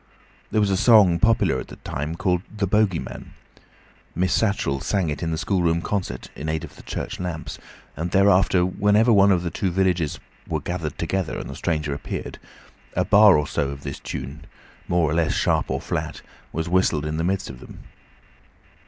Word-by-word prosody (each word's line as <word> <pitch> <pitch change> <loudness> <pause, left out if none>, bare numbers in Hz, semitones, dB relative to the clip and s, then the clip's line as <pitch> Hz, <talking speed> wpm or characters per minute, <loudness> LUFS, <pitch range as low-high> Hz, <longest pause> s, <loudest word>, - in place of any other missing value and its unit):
There 110 - +1
was 100 -2 +2
a 95 - +2
song 100 -6 +6
popular 115 +1 +3
at - - -7
that - - -14
time 75 +4 -3
called 90 -1 0
"The 105 -2 -2
Bogey 100 -2 +2
Man". - - -8 0.8
Miss 90 +2 +1
Statchell 100 -11 0
sang 95 -6 0
it 75 - -5
at 85 - -1
the 80 - -2
schoolroom 85 -2 0
concert 90 -11 -3
(in 80 - -5
aid 80 0 -2
of - - -10
the - - -13
church - - -5
lamps), 90 -3 -5 0.4
and 85 +4 -3
thereafter 95 -1 +4
whenever 105 +5 +3
one 100 -1 +6
or 95 - +4
two 95 - -2
of 90 - -3
the 95 - +3
villagers 85 -5 0 0.3
were - - -1
gathered 85 -5 -4
together 95 +1 -2
and - - -6
the 70 - -7
stranger 75 -2 -1
appeared, 70 - -6 0.6
a 90 - +1
bar 105 -1 +7
or 75 - 0
so 70 -1 -1
of 70 0 -8
this - - -6
tune, 75 +3 -7 0.4
more 85 -2 +2
or 75 - -1
less 80 -1 +1
sharp - - +1
or - - -1
flat, - - -4 0.3
was 80 +1 -3
whistled 85 -4 +1
in 75 +1 -2
the 80 - -1
midst 95 +2 -1
of 60 - -12
them. - - -12
90 Hz, 195 wpm, -23 LUFS, 80-95 Hz, 0.8 s, bar